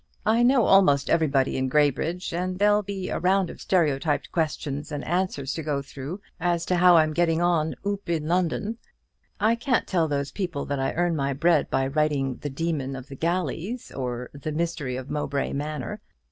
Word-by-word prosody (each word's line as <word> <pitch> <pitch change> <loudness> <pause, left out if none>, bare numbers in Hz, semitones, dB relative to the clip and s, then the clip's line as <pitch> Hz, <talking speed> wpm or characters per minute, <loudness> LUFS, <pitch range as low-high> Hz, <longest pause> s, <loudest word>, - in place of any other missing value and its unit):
"I 225 +2 +3
know 245 -1 +4
almost 145 -8 +4
everybody 140 -5 +2
in 130 0 0
Graybridge; 150 +6 +1
and 180 +1 -2
there'll 205 +1 +4
be 195 -2 -5
a - - -2
round 190 +1 +2
of - - -12
stereotyped 150 -4 +1
questions 150 -2 -2
and 145 -1 -4
answers 175 -6 -1
to 160 - -4
go 145 -2 -2
through 140 +8 -7 0.2
as 170 -1 0
to 180 - +1
how 175 -1 +7
I'm 155 -1 +3
getting 165 0 +2
on 170 -3 +1
'oop 200 -2 -3
in 160 -3 -1
London.' 185 +6 0 0.6
I 215 +2 +3
can't 245 +2 0
tell 170 -4 +1
those 140 -1 -2
people 175 -8 -3
that 140 -1 -2
I 135 - 0
earn 175 -1 +1
my 140 -2 0
bread 165 +6 +2
by 135 0 +1
writing 135 -2 0
'The 145 - -5
Demon 140 -2 -2
of 130 0 -9
the 135 - -8
Galleys,' 180 - -2
or 125 -1 -4
'The 145 +2 -5
Mystery 160 -5 -2
of 130 +2 -6
Mowbray 145 -2 -2
Manor.' 145 -3 -4
160 Hz, 190 wpm, -25 LUFS, 140-180 Hz, 0.6 s, how